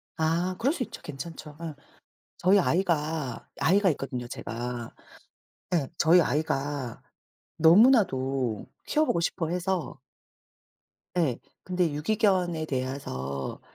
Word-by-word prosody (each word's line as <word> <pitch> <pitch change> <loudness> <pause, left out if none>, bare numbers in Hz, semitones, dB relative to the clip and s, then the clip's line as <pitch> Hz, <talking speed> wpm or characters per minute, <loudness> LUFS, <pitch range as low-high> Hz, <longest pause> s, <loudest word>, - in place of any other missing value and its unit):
아 170 +3 0
그럴 270 +7 +2
수 280 - -2
있죠. - - -9
괜찮죠. 150 +2 -7
어. 165 -3 -5 0.6
저희 190 +3 +4
아이가 160 -7 0
아이가 195 +3 +4
있거든요 130 -4 -4
제가. 120 0 -5 0.8
예. 150 -6 +2
저희 170 +3 +6
아이가 145 -5 -1 0.6
너무나도 135 - +4 0.2
키워 310 - +2
보고 170 - +1
싶어 165 -1 -1
해서 180 -3 -2 1.2
예. 150 -9 +1 0.2
근데 180 -3 0
유기견에 180 -1 +1
대해서 130 - -4
160 Hz, 225 characters per minute, -27 LUFS, 135-180 Hz, 1.2 s, 저희